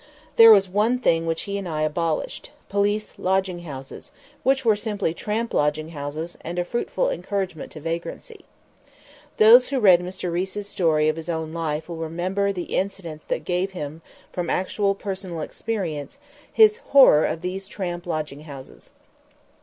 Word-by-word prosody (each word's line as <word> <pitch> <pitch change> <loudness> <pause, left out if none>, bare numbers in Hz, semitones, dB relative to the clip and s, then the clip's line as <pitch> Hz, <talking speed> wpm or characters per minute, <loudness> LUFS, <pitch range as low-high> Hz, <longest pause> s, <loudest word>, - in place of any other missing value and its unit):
There 230 0 +9
was 200 -3 +7
one 210 +6 +1
thing 165 -9 +1
which 165 0 -1
he 200 0 -3
and 190 -3 -5
I 155 -1 -1
abolished 155 +1 -2 0.2
police 205 +1 -1
lodging 190 -1 0
houses, 135 -3 -9 0.3
which 265 0 +1
were 220 -2 +5
simply 205 -5 -2
tramp 220 +6 -3
lodging 150 +2 0
houses, 155 +2 -6
and 170 +2 -5
a 175 - 0
fruitful 370 - -1
encouragement 195 - -4
to 155 - -8
vagrancy. 170 - -6 0.9
Those 235 +4 +8
who 270 -1 -1
read 190 -6 +7
Mr. 180 0 -5
Riis's 190 +3 -3
story 160 -6 +2
of 155 +1 +1
his 165 +1 -7
own 160 -1 -3
life 160 -2 -3
will 170 -2 -6
remember 180 +5 -1
the 180 -3 -5
incidents 180 -5 -4
that - - -3
gave 185 +2 -1
him 155 -2 -6 0.3
from 175 -2 -3
actual 195 +2 0
personal 190 -4 -5
experience 175 - -4 0.3
his 435 -1 +6
horror 270 - +6
of 160 - -1
these 190 +2 -4
tramp 175 -4 -5
lodging 155 -3 -4
houses. 135 -4 -11
180 Hz, 160 wpm, -23 LUFS, 160-205 Hz, 0.9 s, There